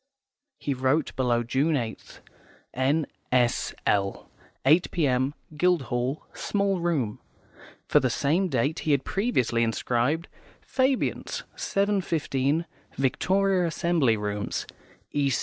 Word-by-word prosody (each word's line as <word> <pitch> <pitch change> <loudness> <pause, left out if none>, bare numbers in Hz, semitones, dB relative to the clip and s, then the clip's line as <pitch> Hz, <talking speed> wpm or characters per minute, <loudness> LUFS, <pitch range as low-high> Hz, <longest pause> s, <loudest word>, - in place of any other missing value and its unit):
He 140 - -2
wrote 130 +4 0
below 120 -2 +1
June 140 +7 +1
8th, 115 -5 -5 0.5
"N.S.L., 125 -7 0 0.3
8 160 +6 +5
p.m., 135 -3 +1 0.2
Guildhall, 140 -6 0
small 200 -2 0
room." 150 -11 -1 0.7
For - - +5
the - - +1
same 170 +7 +1
date 140 +3 0
he 155 - +1
had 140 -1 +1
previously 160 - +1
inscribed, 120 +7 0 0.4
"Fabians, 260 -1 0
7.15, 165 -7 0 0.3
Victoria 185 +7 +2
Assembly 160 -8 +2
Rooms," 105 0 -3 0.5
"E. 145 -1 +1
140 Hz, 95 wpm, -26 LUFS, 125-170 Hz, 0.7 s, 8